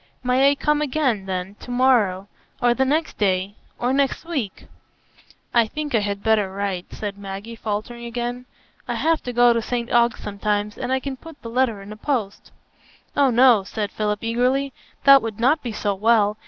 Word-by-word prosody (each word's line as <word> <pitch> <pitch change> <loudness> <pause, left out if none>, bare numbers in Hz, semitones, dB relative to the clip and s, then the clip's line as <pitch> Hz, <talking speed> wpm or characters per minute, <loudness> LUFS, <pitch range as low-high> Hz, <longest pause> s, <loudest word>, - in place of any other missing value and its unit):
"May 255 +2 +4
I 285 - +2
come 300 +1 +1
again, 260 -9 0
then, 185 +1 -3
to - - -12
morrow, 240 -7 +2 0.3
or 240 0 +3
the 265 +2 +1
next 310 +4 -1
day, 190 -1 +1 0.2
or 245 +2 0
next 275 +3 0
week?" 275 - -4 0.9
"I 235 -2 +4
think 300 +4 -5
I 225 - +4
had 200 -1 -3
better 215 -4 +2
write," 195 -2 -3
said 205 -1 -6
Maggie, 200 +3 -7
faltering 225 +2 -4
again. 240 +1 -4 0.4
"I - - -2
have 325 0 +1
to 245 - -5
go 240 0 +5
to 230 - 0
St 235 +1 -3
Ogg's 235 -1 +3
sometimes, 205 +1 -2
and 255 - -4
I 265 - +2
can 265 0 -5
put 325 +1 -13
the 230 - -7
letter 230 -5 0
in 200 - -10
the 215 - -8
post." 225 -5 -3 0.6
"Oh 280 -2 +4
no," 240 -3 +5
said 205 +1 -4
Philip 210 0 -2
eagerly; 255 +4 0 0.3
"that 275 -1 +8
would 225 -2 -5
not 270 +6 +3
be 240 - -4
so 210 -1 -1
well. 210 0 +2
235 Hz, 190 wpm, -22 LUFS, 205-260 Hz, 0.9 s, that